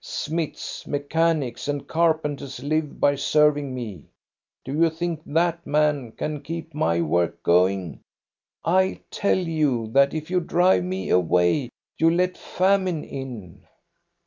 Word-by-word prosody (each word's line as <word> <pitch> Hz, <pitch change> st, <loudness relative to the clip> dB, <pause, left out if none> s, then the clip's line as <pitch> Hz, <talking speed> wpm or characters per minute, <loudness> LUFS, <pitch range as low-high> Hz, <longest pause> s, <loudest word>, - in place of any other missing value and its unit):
Smiths, 160 Hz, 0 st, -4 dB
mechanics, 145 Hz, -3 st, 0 dB
and 145 Hz, -1 st, -3 dB
carpenters 155 Hz, -5 st, 0 dB
live 155 Hz, +1 st, -1 dB
by 140 Hz, -, +4 dB
serving 145 Hz, 0 st, +2 dB
me. 105 Hz, -, -6 dB, 0.6 s
Do 135 Hz, -, -5 dB
you 165 Hz, +2 st, +3 dB
think 165 Hz, 0 st, -3 dB
that 170 Hz, +2 st, +1 dB
man 145 Hz, -5 st, +1 dB
can 150 Hz, -1 st, -4 dB
keep 165 Hz, +2 st, -6 dB
my 85 Hz, -, +1 dB
work 85 Hz, +1 st, 0 dB
going? 90 Hz, -2 st, +2 dB, 0.7 s
I 185 Hz, +2 st, +2 dB
tell 200 Hz, -, +1 dB
you 150 Hz, -10 st, 0 dB
that 140 Hz, +4 st, +4 dB
if 155 Hz, +2 st, -5 dB
you 180 Hz, -, +3 dB
drive 175 Hz, +2 st, +3 dB
me 185 Hz, +1 st, -4 dB
away 90 Hz, -, +2 dB, 0.3 s
you 165 Hz, -, +5 dB
let 180 Hz, +2 st, +1 dB
famine 185 Hz, -3 st, 0 dB
in." 120 Hz, -10 st, -8 dB
150 Hz, 130 wpm, -24 LUFS, 130-165 Hz, 0.7 s, you